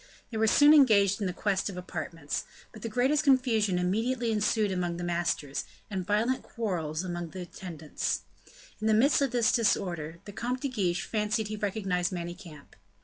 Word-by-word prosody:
They 225 - -3
were 220 0 +3
soon 290 +7 +7
engaged 210 -8 +5
in 190 -2 0
quest 195 +2 0
of 190 - -7
apartments; 165 -4 -4 0.3
but 215 - -11
the 230 - -4
greatest 260 +7 +2
confusion 240 -9 +3
immediately 225 +7 0
ensued 210 -1 +1
among 175 -2 -1
the 175 - -5
masters, 170 -5 -1 0.3
and 190 -2 -2
violent 225 +5 +1
quarrels 175 -8 -3
among 175 -2 -4
their 185 +2 -6
attendants. 170 -4 -4 0.6
In 215 - -1
the 220 - +4
midst 275 +7 +4
of 275 - +2
this 240 -1 +2
disorder, 175 -8 0
the 205 - -8
Comte 250 +4 -3
de 280 - -1
Guiche 185 -8 -1
fancied 215 0 -1
he 215 - -3
recognized 195 -4 -1
Manicamp. 175 -3 -8
205 Hz, 170 wpm, -29 LUFS, 175-230 Hz, 0.6 s, soon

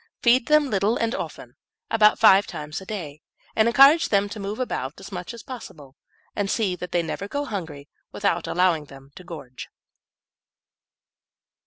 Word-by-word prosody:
Feed 240 +1 +4
them 300 -2 +3
little 205 +3 +1
and 230 +1 -1
often, - - -7 0.3
about 215 -1 +5
five 200 -3 +6
times 150 0 -6
a 190 - -12
day, 155 -8 -6 0.3
and 220 +1 +3
encourage 275 +7 +6
them 200 -1 +2
to 210 - -7
move 200 +2 -4
about 145 - -4
as 195 - -11
much 180 -2 -6
as 235 -1 -10
possible; 150 - -10 0.4
and 200 -1 -1
see 195 -5 0
that 180 0 -8
they 175 -1 +1
never 190 +4 -5
go 285 +6 -3
hungry, 160 - -6 0.2
without 200 -4 -1
allowing 175 -4 +1
them 135 -1 -15
to 180 - -12
gorge. 145 -8 -9
195 Hz, 165 wpm, -24 LUFS, 165-225 Hz, 0.4 s, five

